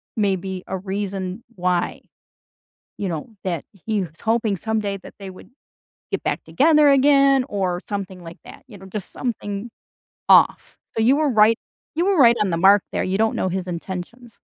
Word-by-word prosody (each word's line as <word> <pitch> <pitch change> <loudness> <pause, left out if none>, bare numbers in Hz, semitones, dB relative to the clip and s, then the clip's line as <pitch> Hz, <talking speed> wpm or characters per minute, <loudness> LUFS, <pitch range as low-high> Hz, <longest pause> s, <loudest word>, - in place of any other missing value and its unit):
maybe 190 -3 -1
a 190 - -3
reason 195 +1 -4
why, 180 -1 -1 1.0
you 200 - -3
know, 160 -4 -4 0.2
that 175 -5 -2
he 210 +2 -3
was 165 -2 -9
hoping 225 -2 +1
someday 210 0 -2
that - - -13
they 195 -1 -8
would 185 - -14 0.6
get - - -2
back - - -2
together 300 +1 +4
again 275 -1 +5
or 185 -3 -1
something 195 -3 -5
like 165 +3 -10
that, - - -13
you 210 -5 -13
know, 190 - -12
just 190 0 -6
something 215 -3 -4 0.6
off. - - +4 0.2
So, 225 - +1
you 255 +5 +4
were 305 0 +2
right 220 -1 +5 0.4
you 335 +3 +1
were 395 -1 +2
right 235 -5 +6
on 205 -3 +1
the 165 - 0
mark 195 +3 +5
there, - - -1
you 190 +1 -1
don't 220 0 +2
know 185 - -1
his 185 0 -3
intentions. 190 +7 -7
200 Hz, 180 wpm, -22 LUFS, 185-230 Hz, 1.0 s, right